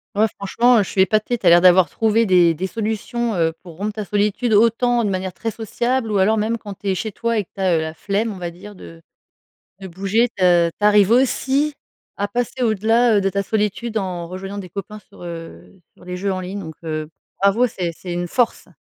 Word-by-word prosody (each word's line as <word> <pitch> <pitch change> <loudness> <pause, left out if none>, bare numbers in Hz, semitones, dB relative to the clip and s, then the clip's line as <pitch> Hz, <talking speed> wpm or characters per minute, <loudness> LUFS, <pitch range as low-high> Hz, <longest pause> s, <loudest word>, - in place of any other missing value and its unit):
Ouais, 215 +2 +3
franchement, 235 +5 +3
heu, 210 - +4
je - - -8
suis 190 - +1
épatée. 215 +5 +1
Tu - - -8
as - - +9
l'air 170 +1 +7
d'avoir 185 0 +6
trouvé 225 0 +1
des 175 -3 +5
des 180 +4 -3
solutions, 225 +2 -2
heu, 165 -2 +1
pour 170 -3 -12
rompre 210 +3 -3
ta 215 -1 -5
solitude, 210 +4 0
autant 235 +2 +3
de 210 - 0
manière 185 -1 -3
très 225 - -4
sociable, 230 +2 -2
ou 205 - +1
alors, 215 +4 +3
même 225 +2 -1
quand 205 -2 -8
tu 200 - -9
es - - +2
chez 215 +4 -3
toi 230 +2 -1
et 205 - -3
que - - -51
tu 195 - -6
as, 185 -3 +3
heu, - - 0
la 160 0 -4
flemme, 205 +6 -1
on 200 - -8
va 175 -1 -5
dire, 200 +4 -12
de 165 -2 -13 0.8
de 190 - -8
bouger, 195 +6 +1
de 175 -2 +4
tu 210 - 0
arrives 210 -1 +5
aussi 270 +4 +2 0.4
à 205 +1 -1
passer 245 +4 -2
au-delà, 225 +1 +3
heu, 205 - +3
de 195 0 0
la 200 0 0
solitude 220 +2 -2
en 180 -4 -3
rejoignant 195 +3 -7
des 190 -3 -7
copains 205 +3 -7
sur, 190 - -16
heu, 170 +2 -9 0.2
sur - - -19
les 180 0 -6
jeux 195 +1 -1
en 185 - -4
ligne 190 +2 -5
donc 160 -5 -8
heu, 155 -1 -4 0.3
bravo. 200 +5 +4
C'est 180 -6 -3
c'est 180 - -8
une 175 0 -2
force. 240 +6 0
200 Hz, 235 wpm, -20 LUFS, 185-225 Hz, 0.8 s, as